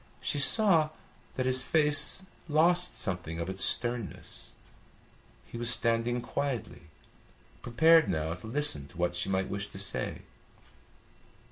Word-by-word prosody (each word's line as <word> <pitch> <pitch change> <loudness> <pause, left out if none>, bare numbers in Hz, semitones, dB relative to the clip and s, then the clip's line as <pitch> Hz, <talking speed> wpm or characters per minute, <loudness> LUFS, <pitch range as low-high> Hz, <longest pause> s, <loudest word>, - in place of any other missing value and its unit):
She 145 - -2
saw 165 -1 +6 0.5
that 130 - -2
his 130 0 +1
face 150 +5 +3 0.2
lost 170 +3 +2
something 90 -4 -2
of 85 +3 -4
its 95 - 0
sternness. 120 -4 -1 0.9
He 115 - -10
was 120 0 0
standing 115 +1 0
quietly, 130 0 -5 0.8
prepared 160 +4 +3
now 80 -2 -2
to 90 +6 -11
listen 115 - -1
to 70 - -18
what 85 0 -2
she 90 - -2
might 95 0 -1
wish 100 0 -5
to - - -11
say. 95 -1 -3
120 Hz, 130 wpm, -28 LUFS, 95-150 Hz, 0.9 s, saw